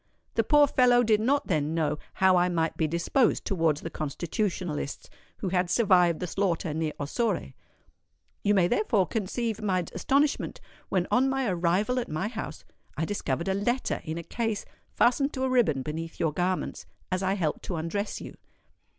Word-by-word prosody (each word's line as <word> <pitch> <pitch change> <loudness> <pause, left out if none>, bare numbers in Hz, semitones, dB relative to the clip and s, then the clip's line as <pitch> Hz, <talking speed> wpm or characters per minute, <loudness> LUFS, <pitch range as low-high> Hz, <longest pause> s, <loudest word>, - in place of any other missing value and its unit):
The - - +2
poor 295 -1 +6
fellow 245 -3 +4
did 220 -2 +3
not 280 +5 +2
then 155 -3 0
know 150 -2 0 0.2
how 190 -1 +4
I 180 0 +3
might 165 -2 0
be 160 - +1
disposed 170 - +1
towards 165 -6 +1
the 165 - -6
Constitutionalists 160 0 -3 0.3
who 190 - -3
had 180 -1 +1
survived 180 -6 +4
the 180 - -2
slaughter 175 -3 -1
near 155 -1 -2
Ossore. 170 - -1 0.9
You 205 +1 +2
may 180 -3 +4
therefore 230 - +2
conceive 225 +3 -2
my 185 -4 0
astonishment 275 +10 +1 0.3
when 185 -2 +1
on 260 +2 +4
my 265 -1 0
arrival 185 +7 +1
at 240 - -4
my 155 +7 -2
house, 220 -2 -6 0.3
I 160 - 0
discovered 170 -4 -2
a 190 - +2
letter 240 +6 -1
in 160 +1 -4
a 170 - -5
case 225 +2 -2 0.3
fastened 275 +4 +3
to 260 - -2
a 265 - +1
riband 185 - +2
beneath 165 +3 -5
your 160 -2 +1
garments, 180 +3 -2 0.2
as 185 0 0
I 190 +1 +1
helped 165 -6 -1
to 180 - -3
undress 170 +6 -3
you. - - -8
185 Hz, 175 wpm, -27 LUFS, 165-230 Hz, 0.9 s, poor